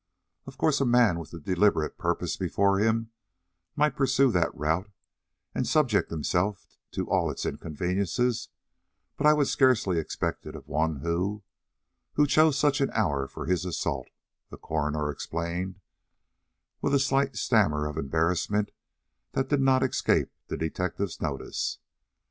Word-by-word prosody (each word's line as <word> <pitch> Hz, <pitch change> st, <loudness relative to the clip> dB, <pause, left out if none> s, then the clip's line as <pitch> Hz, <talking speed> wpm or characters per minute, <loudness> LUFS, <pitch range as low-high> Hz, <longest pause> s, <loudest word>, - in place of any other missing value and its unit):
Of -, -, -10 dB
course 150 Hz, -3 st, +2 dB
a -, -, +3 dB
man 120 Hz, -8 st, +4 dB
with 85 Hz, -, -9 dB
a 85 Hz, -, -8 dB
deliberate 90 Hz, -1 st, +1 dB
purpose -, -, -1 dB
before 100 Hz, 0 st, +1 dB
him 115 Hz, +1 st, +1 dB, 0.6 s
might 150 Hz, 0 st, +2 dB
pursue 135 Hz, -1 st, +3 dB
that 90 Hz, -4 st, +1 dB
route 80 Hz, +7 st, 0 dB, 0.6 s
and -, -, -1 dB
subject 135 Hz, -9 st, +2 dB
himself 90 Hz, +5 st, -1 dB, 0.3 s
to -, -, -2 dB
all -, -, +1 dB
its -, -, -4 dB
inconveniences; 100 Hz, -, -1 dB, 0.7 s
but 150 Hz, -, +2 dB
I 150 Hz, -, +8 dB
would 150 Hz, -2 st, +2 dB
scarcely 115 Hz, -10 st, +3 dB
expect 80 Hz, -, -3 dB
it -, -, -7 dB
of -, -, -10 dB
one 80 Hz, -2 st, -1 dB
who 90 Hz, +5 st, -1 dB, 0.7 s
who 150 Hz, -, +4 dB
chose 155 Hz, 0 st, +4 dB
such 145 Hz, -1 st, +2 dB
an 135 Hz, -, +2 dB
hour 70 Hz, -11 st, 0 dB
for -, -, -7 dB
his 90 Hz, +1 st, 0 dB
assault," 70 Hz, -7 st, -2 dB, 0.4 s
the -, -, -10 dB
coroner 75 Hz, -1 st, -1 dB
explained, 85 Hz, +5 st, -4 dB, 1.0 s
with 140 Hz, -, +2 dB
a -, -, +4 dB
slight 135 Hz, 0 st, +1 dB
stammer 75 Hz, -11 st, +2 dB
of 75 Hz, -, -5 dB
embarrassment 85 Hz, +8 st, 0 dB, 0.6 s
that 135 Hz, 0 st, -1 dB
did 145 Hz, -2 st, +2 dB
not 130 Hz, -1 st, +4 dB
escape 130 Hz, -, +1 dB, 0.2 s
the -, -, -4 dB
detective's 90 Hz, +3 st, -3 dB
notice. 70 Hz, -4 st, -3 dB
100 Hz, 145 wpm, -27 LUFS, 80-130 Hz, 1.0 s, I